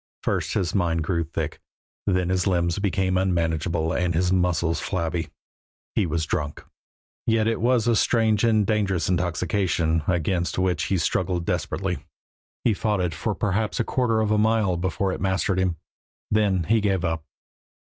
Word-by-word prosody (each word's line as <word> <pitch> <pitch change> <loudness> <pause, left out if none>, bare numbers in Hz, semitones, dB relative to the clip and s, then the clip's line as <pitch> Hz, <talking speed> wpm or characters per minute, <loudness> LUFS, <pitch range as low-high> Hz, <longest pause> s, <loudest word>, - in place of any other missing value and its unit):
First - - -1
his 90 -2 0
mind 85 -4 +1
grew 85 +1 0
thick, 80 - -4 0.5
then 90 -2 +1
his 90 0 +1
limbs 85 -1 +1
became 95 -2 +1
unmanageable 80 -3 0
and 90 -2 0
his 90 +2 +2
muscles 85 -3 +1
flabby. 85 -3 -2 0.6
He 100 - +1
was 80 0 -1
drunk. 75 -1 -3 0.6
Yet 110 -1 +3
it 115 - 0
was 120 -1 +2
a 120 - +4
strange 110 -1 +2
and 110 -3 +3
dangerous 100 -4 0
intoxication, 90 -2 0
against 90 0 0
which 90 -4 +1
he 95 - +1
struggled 85 +1 0
desperately. - - -2 0.6
He 115 - +3
fought 105 0 0
it 90 -3 0
for 100 +6 -2
perhaps 105 +4 -1
a - - +3
quarter 115 -2 +1
of 110 -1 0
a 105 - +3
mile 110 -4 +2
before 95 +2 -1
it - - -6
mastered 95 0 +1
him; 90 -2 +1 0.6
then 100 -4 +2
he 110 +6 +2
gave 95 -3 +1
up. 80 -1 -1
95 Hz, 160 wpm, -24 LUFS, 85-105 Hz, 0.6 s, a